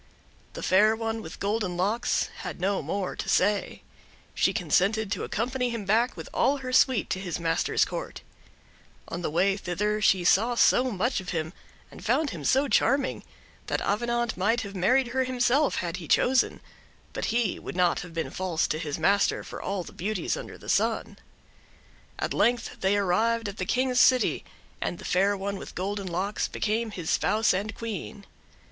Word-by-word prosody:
The - - -7
Fair 210 +4 +4
One 225 0 -3
with 160 - -9
Golden 200 -3 -1
Locks 210 +6 0
had - - -6
no 195 +2 0
more 185 +6 -3
to - - -5
say. 205 +2 +1 0.5
She - - +2
consented 200 +3 +1
to 205 - -2
accompany 250 +2 -1
him 230 -4 -4
back, 230 +6 +2
with - - -7
all 285 - +2
her 255 -2 -6
suite, 255 -3 +4
to 185 - -1
his 180 -3 -4
master's 165 -1 +1
court. - - -6 0.9
On 170 - -4
the 170 - -1
way 185 +5 +2
thither 210 +3 -2
she 190 -4 +3
saw 225 +7 +3
so 245 +2 +4
much 235 +4 0
of 185 -1 -7
him, 160 0 -3 0.4
and - - -12
found 310 -3 +1
him 165 -5 -7
so 270 - +3
charming, 270 +1 +1 0.4
that - - 0
Avenant 235 +2 0
might 225 +6 +1
have 200 -1 -7
married 245 +8 +2
her 260 +2 +1
himself 255 +3 +2
had 175 -1 -3
he 170 -3 -8
chosen; 260 - +2 0.5
but - - -3
he 230 -3 0
would - - -7
not 180 -1 +2
have 180 - -8
been 165 - -2
false 180 -4 -1
to 155 - -1
his 150 -3 -3
master 200 +5 +2
for - - -8
all 195 -2 -2
the - - -12
beauties 200 +1 -2
under - - -8
the - - -14
sun. - - 0 1.0
At - - -2
length 240 -1 +1
they 195 +2 +2
arrived 220 +4 +1
at 200 +1 -6
the 185 - -2
King's 255 0 +1
city, 255 -1 +4 0.4
and 175 - -2
the - - -11
Fair 200 +2 +2
One 200 +1 -3
with - - -9
Golden 195 +1 -3
Locks 185 +4 -1
became 220 +2 -1
his 180 -6 -4
spouse 220 -1 +2
and 205 +4 -3
Queen. 215 -2 -6
205 Hz, 180 wpm, -27 LUFS, 185-235 Hz, 1.0 s, Fair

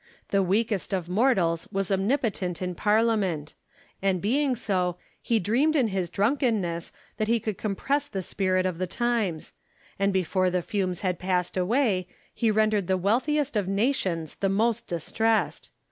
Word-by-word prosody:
The 200 - +3
weakest 200 +1 0
of 180 -3 -2
mortals 185 -6 +2
was 195 0 -1
omnipotent 195 - 0
in 180 -1 -3
Parliament; 210 -6 +1 0.5
and 190 -1 +1
being 260 - +1
so, 185 -6 -1 0.2
he 230 -2 +1
dreamed 255 - +2
in 255 -7 +3
his 190 -3 -2
drunkenness 205 - 0 0.3
that 215 -1 0
he 230 +1 +2
could 215 -1 -3
compress 275 +8 -1
the 195 -9 -4
spirit 185 0 0
of 180 -2 -2
the 185 - -1
times; 220 -7 -1 0.5
and 200 0 +2
before 185 0 +1
the 180 -1 -1
fumes 185 -3 -2
had 185 -2 -1
passed 180 -1 -1
away, 190 -1 +1 0.3
he 230 - +1
rendered 215 -3 +2
the 190 - +2
wealthiest 260 - +1
of 205 -3 0
nations 195 - 0
the 195 - -1
most 225 +4 +1
distressed. 220 +6 0
195 Hz, 155 wpm, -26 LUFS, 185-230 Hz, 0.5 s, The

